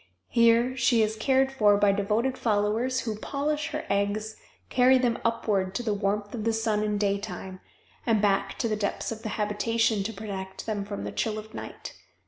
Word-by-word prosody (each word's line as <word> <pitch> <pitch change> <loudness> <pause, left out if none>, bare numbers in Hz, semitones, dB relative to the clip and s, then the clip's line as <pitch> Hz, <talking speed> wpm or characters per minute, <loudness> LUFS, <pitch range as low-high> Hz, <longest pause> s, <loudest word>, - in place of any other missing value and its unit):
Here 235 +2 +4
she 235 -2 +3
is 215 0 -1
cared 265 +4 +2
for 210 -6 +4
by 205 0 +4
devoted 210 +6 0
followers 220 +4 0
who 220 -3 -3
polish 295 +5 -2
her 305 -1 -4
eggs, 205 +2 -1 0.3
carry 255 +1 +5
them 245 -2 +1
upward 205 -5 0
to 245 - -2
the 215 -3 0
warmth 205 0 -1
of 225 -3 -4
the 225 +1 +1
sun 220 -1 0
in 210 -1 0
daytime, 195 -2 -3 0.4
and 225 -3 +2
back 200 -1 +1
to - - 0
the 215 - 0
depths 205 +1 -2
of 220 -1 -6
the 220 - -4
habitation 215 +1 +1
to 205 +3 -3
protect 195 -2 -6
them 210 -3 -2
from 200 0 -5
the - - -4
chill 215 -1 -1
of 215 +1 -9
night. - - -8
215 Hz, 190 wpm, -27 LUFS, 205-235 Hz, 0.4 s, carry